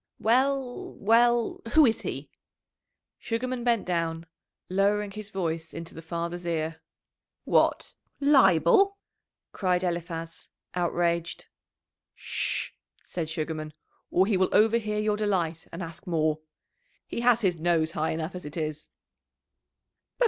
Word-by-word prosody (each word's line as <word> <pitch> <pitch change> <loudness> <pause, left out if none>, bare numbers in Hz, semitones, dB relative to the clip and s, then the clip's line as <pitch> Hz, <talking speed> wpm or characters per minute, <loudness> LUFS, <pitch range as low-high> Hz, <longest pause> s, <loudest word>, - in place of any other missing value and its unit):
"Well, 260 +2 +1
well 235 +2 +3
who 310 -2 +8
is 225 -3 +1
he?" - - -5 0.9
Sugarman 245 +2 -2
bent 235 -3 +2
down, 165 -2 -1 0.4
lowering 200 +2 +1
his 210 0 -7
voice 165 -4 -3
into 165 0 -7
the 165 - -9
father's 170 +1 -4
ear. 160 -1 -2 0.6
"What! - - +2 0.3
Leibel!" 280 - +5 0.5
cried 180 -2 0
Eliphaz, 170 -2 -4 0.2
outraged. 170 -1 -1 0.7
"Sh!" - - -2 0.3
said 165 -3 -4
Sugarman, 155 -1 -4 0.4
"or 185 - +3
he 200 -1 +1
will 185 0 +2
overhear 215 0 +3
your 210 0 +1
delight, 175 -6 -1
and 175 +2 -5
ask 165 +1 -9
more. 155 -2 +1 0.7
He - - -4
has 240 -1 +4
his 180 -5 +1
nose 165 -1 +2
high 160 -1 -1
enough 160 +2 -3
as 180 0 -7
it 150 +3 -7
is." 155 -1 -4
180 Hz, 120 wpm, -27 LUFS, 165-215 Hz, 0.9 s, who